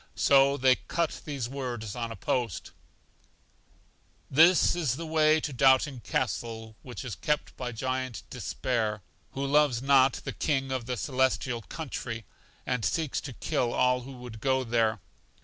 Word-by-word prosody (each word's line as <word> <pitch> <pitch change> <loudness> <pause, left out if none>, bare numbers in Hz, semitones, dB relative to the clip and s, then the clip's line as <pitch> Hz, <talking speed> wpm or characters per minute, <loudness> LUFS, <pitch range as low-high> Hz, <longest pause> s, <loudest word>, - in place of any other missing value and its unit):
So 140 0 +4
they 130 -1 +4
cut 170 -2 -1
these 140 -6 -3
words 120 -5 -5
on 115 -2 -3
a - - -5
post: 120 -6 -2 1.6
This 165 +7 +6
is 150 -8 0
the 165 +4 -6
way 155 0 +4
to 150 -2 -4
Doubting 130 +1 +4
Castle, 110 0 -3
which 125 +1 -8
is 120 - -4
kept 150 +12 -2
by 125 -1 -4
Giant 130 -2 -3
Despair, 110 -5 -2 0.3
who 135 +1 -2
loves 145 -3 +3
not 135 -1 +5
the - - -6
King 135 -3 -1
of 130 -3 -3
the 125 -1 -2
Celestial 130 -2 0
Country, 115 -5 -6 0.4
and 125 -3 -1
seeks 160 +2 -1
to 135 - -7
kill 120 0 -1
all 125 0 +3
who 135 +2 -9
would 125 -3 -10
go 130 0 +2
there. 115 -2 +1
130 Hz, 150 wpm, -28 LUFS, 120-140 Hz, 1.6 s, This